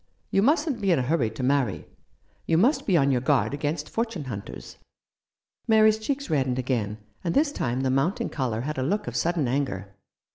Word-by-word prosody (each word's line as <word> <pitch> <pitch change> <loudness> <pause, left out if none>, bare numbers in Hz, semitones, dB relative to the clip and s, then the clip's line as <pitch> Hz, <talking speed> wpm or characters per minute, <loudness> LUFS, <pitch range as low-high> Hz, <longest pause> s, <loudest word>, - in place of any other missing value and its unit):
You 195 - +3
mustn't 290 - +2
be 195 -2 +2
in 170 - +4
a 130 - +1
hurry 130 -4 +1
to 110 +4 -6
marry. 130 -5 +1 0.6
You 165 - +3
must 245 - +2
be 185 -5 +4
on 140 -2 +3
your 125 -2 +1
guard 140 0 +2
against 150 +1 -2
fortune 225 -7 -3
hunters." 105 -7 -8 0.9
Mary's 220 -1 +5
cheeks 280 +5 -3
reddened 130 -4 0
again, 120 -5 -1 0.3
and 170 -2 -1
this 290 0 +3
time 125 - -2
the 130 -1 +1
mounting 135 +9 0
colour 120 -6 -2
had 150 +2 -3
a - - 0
look 200 +10 -1
of 120 - -6
sudden 160 +2 0
anger. 110 -8 -2
145 Hz, 190 wpm, -26 LUFS, 125-195 Hz, 0.9 s, Mary's